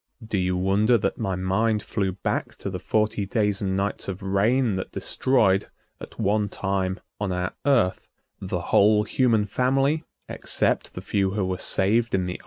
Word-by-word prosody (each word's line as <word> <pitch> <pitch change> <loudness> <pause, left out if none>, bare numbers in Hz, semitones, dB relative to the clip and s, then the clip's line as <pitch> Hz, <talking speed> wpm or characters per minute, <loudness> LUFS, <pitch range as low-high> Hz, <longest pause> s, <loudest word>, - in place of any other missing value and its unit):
Do 110 -3 -1
you 90 0 0
wonder 100 +6 +3
that 110 - -2
my 95 -5 -1
mind 105 +4 0
flew 95 -3 -2
back 95 - -3
to 100 - -5
the 90 - -4
forty 105 +1 0
days 105 -2 0
and 95 -1 -1
nights 100 +1 -2
of 95 0 -5
rain 105 +5 +2
that 95 - -5
destroyed, 105 -7 +1 0.3
at - - -11
one 105 0 +1
time, 95 -1 -2 0.2
on 105 -2 -2
our 90 0 -2
Earth, 120 -10 +2 0.3
the - - -3
whole 105 +1 +5
human 115 -2 +2
family, 135 +8 +1 0.2
except - - -1
the - - -5
few 95 -1 0
who 100 -3 0
were 95 0 -3
saved 110 +5 +1
in 95 -1 0
the 90 - -3
ark? - - -9
100 Hz, 180 wpm, -24 LUFS, 95-110 Hz, 0.3 s, whole